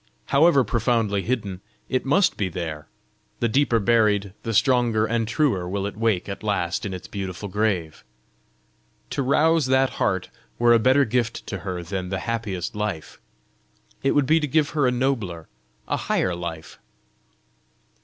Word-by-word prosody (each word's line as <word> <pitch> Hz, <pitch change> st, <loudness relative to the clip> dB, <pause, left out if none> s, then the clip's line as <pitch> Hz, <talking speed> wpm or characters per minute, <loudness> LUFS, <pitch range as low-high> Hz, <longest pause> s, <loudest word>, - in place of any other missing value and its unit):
However 140 Hz, -1 st, +5 dB
profoundly 115 Hz, -3 st, 0 dB
hidden, 100 Hz, -4 st, -3 dB, 0.3 s
it 130 Hz, 0 st, -1 dB
must 190 Hz, +7 st, +3 dB
be 100 Hz, -3 st, -1 dB
there! 80 Hz, -4 st, -5 dB, 0.5 s
The 120 Hz, -, +2 dB
deeper 120 Hz, 0 st, +2 dB
buried, 105 Hz, -3 st, +2 dB
the 115 Hz, -, -3 dB
stronger 120 Hz, -2 st, +3 dB
and 115 Hz, 0 st, -1 dB
truer 115 Hz, -, 0 dB
will 100 Hz, +1 st, -2 dB
it 100 Hz, -, -4 dB
wake 110 Hz, -4 st, 0 dB
at 100 Hz, -, -6 dB
last 100 Hz, -2 st, -1 dB
in 95 Hz, -, -5 dB
its 90 Hz, -, -9 dB
beautiful 95 Hz, 0 st, -5 dB
grave! 95 Hz, -6 st, -1 dB, 1.1 s
To -, -, -1 dB
rouse 150 Hz, +2 st, +3 dB
that 130 Hz, 0 st, +3 dB
heart 95 Hz, -1 st, 0 dB, 0.3 s
were 120 Hz, 0 st, +5 dB
a 115 Hz, -, +5 dB
better 130 Hz, +4 st, +4 dB
gift 120 Hz, 0 st, -1 dB
to 100 Hz, -, -5 dB
her 90 Hz, -1 st, -5 dB
than 90 Hz, +1 st, -4 dB
the 95 Hz, -, -2 dB
happiest 105 Hz, -7 st, -3 dB
life! 105 Hz, -7 st, -4 dB, 0.8 s
It 135 Hz, -, +2 dB
would 145 Hz, -2 st, +3 dB
be 160 Hz, +4 st, +4 dB
to 150 Hz, -, -1 dB
give 150 Hz, +1 st, +1 dB
her 145 Hz, -4 st, +2 dB
a -, -, +2 dB
nobler, 120 Hz, -11 st, -2 dB, 0.4 s
a -, -, 0 dB
higher 90 Hz, -, 0 dB
life!" 85 Hz, -2 st, -7 dB
110 Hz, 160 wpm, -24 LUFS, 95-130 Hz, 1.1 s, However